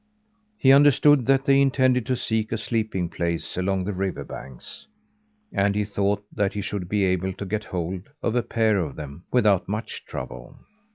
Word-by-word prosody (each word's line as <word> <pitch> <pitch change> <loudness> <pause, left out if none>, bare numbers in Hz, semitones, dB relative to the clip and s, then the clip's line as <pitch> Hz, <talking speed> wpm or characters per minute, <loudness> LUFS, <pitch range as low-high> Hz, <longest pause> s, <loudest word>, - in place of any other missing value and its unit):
He 135 - +5
understood 145 -1 +5
that 135 0 +3
they 135 0 +5
intended 130 -3 +2
to 130 - +1
seek 110 -2 -1
a 115 - 0
sleeping 110 -5 -1
place 85 0 -3
along 95 +1 0
the 105 +3 -3
river 95 0 -3
banks, 65 -2 -9 0.7
and 100 0 +2
he 105 0 +1
thought 100 0 -1
that 100 -2 0
he 105 - -3
should 95 -3 -4
be 105 0 +1
able 95 0 0
to 100 - -6
get 105 +2 -3
hold 90 - -4
of 115 - 0
a 120 - +3
pair 110 -3 +1
of 80 -6 -3
them 75 +3 -9
without 105 -7 +3
much 110 +3 -4
trouble. 65 0 -8
100 Hz, 180 wpm, -24 LUFS, 90-115 Hz, 0.7 s, He